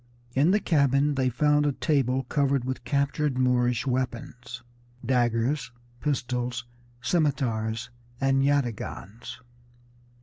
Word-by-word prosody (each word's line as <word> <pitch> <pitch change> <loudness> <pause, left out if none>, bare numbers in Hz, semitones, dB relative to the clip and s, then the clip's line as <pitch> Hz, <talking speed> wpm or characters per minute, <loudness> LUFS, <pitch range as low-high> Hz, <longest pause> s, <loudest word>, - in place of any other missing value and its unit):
In 140 +6 +3
the 205 +3 +4
cabin 140 -4 +2
they 130 -2 +1
found 150 +4 +2
a 145 - +1
table 135 -3 +1
covered 140 0 +1
with 130 -1 -4
captured 140 +2 0
Moorish 125 -1 +2
weapons, 125 -2 -3 0.4
daggers, 120 +2 +1 0.3
pistols, 125 -4 -2 0.4
scimitars, 125 -6 0 0.3
and 135 0 +2
yataghans. 120 -6 -2
130 Hz, 100 wpm, -27 LUFS, 120-140 Hz, 0.4 s, the